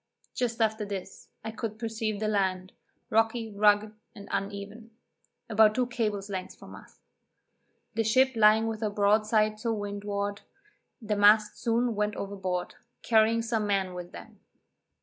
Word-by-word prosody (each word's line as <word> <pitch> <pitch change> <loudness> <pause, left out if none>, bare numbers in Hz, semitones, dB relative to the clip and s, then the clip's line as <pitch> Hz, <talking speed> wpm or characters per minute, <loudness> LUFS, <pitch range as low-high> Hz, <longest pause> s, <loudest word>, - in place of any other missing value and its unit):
Just 240 -2 -2
after 220 -1 +1
this, 195 -2 -7 0.2
I 220 - -3
could 220 0 -5
perceive 220 -2 -3
the 215 - -1
land, 190 -3 -1 0.4
rocky, 225 0 +1
rugged 210 +1 +3 0.2
and 200 -2 -11
uneven, 200 +3 -5 0.6
about 220 -1 +4
two 255 - +2
cables' 215 -5 -2
length 190 -2 -5
from - - -13
us. - - -15 0.9
The 225 +1 0
ship 260 +4 +3
lying 220 0 +5
with 225 -1 -4
her 215 - 0
broadside 215 +1 +2
to 230 +1 -1
windward, 205 -1 -3 0.6
the 210 -1 -1
masts 210 +1 +4
soon 235 +1 +1
went 210 0 -1
overboard, 190 -3 -4 0.3
carrying 225 0 +3
some 225 -2 -1
men 195 -2 0
with 180 0 -8
them. 215 -3 -12
215 Hz, 145 wpm, -28 LUFS, 200-225 Hz, 0.9 s, lying